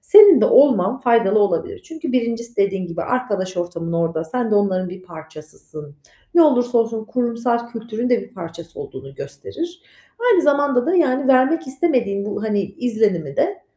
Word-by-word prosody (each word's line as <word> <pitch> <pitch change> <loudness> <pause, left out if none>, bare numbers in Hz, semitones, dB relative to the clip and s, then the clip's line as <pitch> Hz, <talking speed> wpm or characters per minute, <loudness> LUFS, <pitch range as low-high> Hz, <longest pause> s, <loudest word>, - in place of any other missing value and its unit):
senin 410 -3 +8
de - - +4
olman 255 -4 +4
faydalı 230 -5 +3
olabilir. 210 - -1
Çünkü 320 -4 -6
1'incisi 235 -1 -2
dediğin 195 -2 0
gibi 170 0 -5
arkadaş 200 -7 -3
ortamın 170 -1 -4
orada. 165 -1 -1
Sen 235 +7 -3
de 210 - +2
onların 185 -3 +1
bir 185 +1 -10
parçasısın. 155 -3 -12 0.4
Ne 340 - +7
olursa 245 -5 +2
olsun 225 -1 -1
kurumsal 235 0 -2
kültürün 230 +1 -5
de 240 - +3
bir - - -15
parçası 170 -2 -9
olduğunu 135 +1 -10
gösterir. 340 - -8 0.5
Aynı 350 -5 +3
zamanda 285 -3 +2
da, 360 +3 +1
yani, 275 -4 +1
vermek 270 +6 +3
istemediğin 250 -8 -1
bu, 210 +1 -4
hani, 210 -2 0
izlenimi 200 - -2
de, 375 +5 -1
230 Hz, 160 wpm, -20 LUFS, 185-260 Hz, 0.5 s, senin